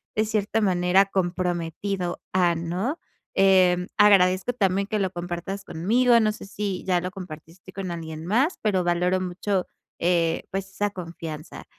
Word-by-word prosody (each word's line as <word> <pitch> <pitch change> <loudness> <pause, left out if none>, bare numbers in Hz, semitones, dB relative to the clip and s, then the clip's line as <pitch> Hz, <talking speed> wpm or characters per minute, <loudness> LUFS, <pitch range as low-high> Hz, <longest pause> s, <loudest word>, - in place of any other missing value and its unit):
de 215 - +2
cierta 215 +1 0
manera 185 0 +3
comprometido 180 0 -2
a, 175 -2 +3
¿no? 180 - -2 0.4
Eh, 185 -2 +4
agradezco 195 +1 +5
también 195 -3 +1
que 215 - -1
lo 190 -2 0
compartas 175 +3 -5
conmigo. 235 +9 +3
No 215 0 +2
sé 210 - -9
si 200 -2 -4
ya 180 -2 +2
lo 180 0 -4
compartiste 180 -1 -11
con 185 -2 -4
alguien 160 -1 -6
más, 255 - +1
pero 190 -5 +1
valoro 180 +2 +1
mucho, 185 +1 -2 0.3
eh, 170 -1 +1
pues, 195 0 -3
esa 205 +2 -1
confianza. 165 -4 -8
185 Hz, 150 wpm, -25 LUFS, 175-200 Hz, 0.4 s, agradezco